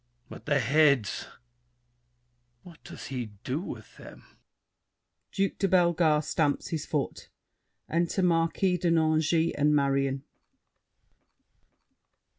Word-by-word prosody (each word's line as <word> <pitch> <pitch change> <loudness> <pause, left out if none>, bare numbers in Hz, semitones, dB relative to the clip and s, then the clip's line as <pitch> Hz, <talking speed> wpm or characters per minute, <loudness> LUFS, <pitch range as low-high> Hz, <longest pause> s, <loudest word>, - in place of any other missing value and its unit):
But - - -12
the 145 -1 +3
heads; 135 -4 +2 1.4
what 170 -3 -15
does - - -10
he 120 -5 -5
do 130 +4 -2
With 180 - -9
them? - - -13 1.1
[Duke 195 -1 -1
de 195 - +2
Bellegarde 170 -4 +3
stamps 150 -2 0
his 160 -3 -4
foot. - - -3 0.6
Enter 170 +3 0
Marquis 175 +2 +1
de 175 0 0
Nangis 160 0 +2
and 150 +1 +2
Marion. 135 -1 0
155 Hz, 100 wpm, -28 LUFS, 140-170 Hz, 1.4 s, the